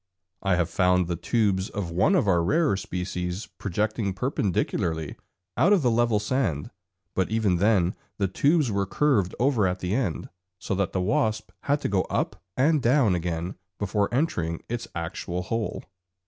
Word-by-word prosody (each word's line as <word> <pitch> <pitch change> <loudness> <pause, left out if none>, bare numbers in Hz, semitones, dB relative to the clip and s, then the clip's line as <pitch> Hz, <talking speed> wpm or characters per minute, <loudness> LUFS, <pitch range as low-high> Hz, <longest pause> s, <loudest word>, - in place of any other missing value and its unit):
I 95 -2 +2
have 85 -1 0
found 90 0 +3
the 85 - -1
tubes 100 0 0
of 95 -5 -4
one 95 - +3
of 150 - +2
our 85 -3 +3
rarer 150 - +2
species 90 +1 -4
projecting 105 +1 -1
perpendicularly 85 - -1 0.4
out 195 +5 +4
of 185 -7 +3
the 120 - +3
level 115 -1 +3
sand, 105 - -1 0.4
but 95 - 0
even 110 -5 +2
then 95 -2 +3 0.2
the 100 - +1
tubes 145 - +2
were 100 -1 0
curved 110 -9 +1
over 120 -6 +3
at 90 +1 -1
the 90 +1 -3
end, 110 -9 -1 0.3
so 95 - -3
that 95 -1 -1
the 95 - 0
wasp 110 +3 0
had 145 +1 +1
to - - 0
go 100 -2 +2
up - - -2 0.2
and 150 +3 +3
down 120 -4 +4
again 85 0 -2 0.2
before 100 0 0
entering 90 - -1
its 120 0 -4
actual 85 +1 -4
hole. 115 +3 -3
100 Hz, 165 wpm, -26 LUFS, 90-120 Hz, 0.4 s, out